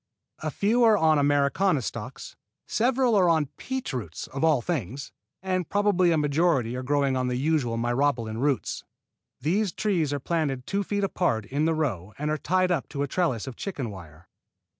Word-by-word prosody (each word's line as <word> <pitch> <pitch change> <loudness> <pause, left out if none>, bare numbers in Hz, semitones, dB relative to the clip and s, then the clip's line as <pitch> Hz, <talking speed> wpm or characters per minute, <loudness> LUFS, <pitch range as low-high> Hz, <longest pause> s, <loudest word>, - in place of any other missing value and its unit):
A - - -3
few 230 +5 +2
are 220 -2 +6
on 155 -4 +4
Americana 145 +3 +2
stocks, - - -6 0.3
several 250 +1 +2
are 185 -3 +4
on 160 -4 +2
peach 260 - -4
roots 105 -11 -5
(of 135 +2 -5
all 155 -4 +4
things), 135 - -4 0.3
and 185 -3 -1
probably 200 -4 +3
a 165 - +3
majority 145 -5 +1
are 130 - -3
growing 140 0 +1
on 130 -1 0
the 125 - -1
usual 135 -4 0
Myrobalan 120 -2 0
roots. 140 -3 -1 0.6
These 190 +7 +1
trees 175 -9 0
are 145 - -1
planted 140 -4 -1
two 200 +1 -1
feet 205 +1 -2
apart 175 - 0
in 140 +8 -1
the 165 0 +2
row 110 - -2
and 150 +1 -2
are 155 - 0
tied 185 +2 +1
up 165 -6 -1
to 140 -1 -2
a - - -2
trellis 130 - 0
of 130 -3 -7
chicken 140 - -4
wire. 85 -3 -12
145 Hz, 185 wpm, -26 LUFS, 125-180 Hz, 0.6 s, are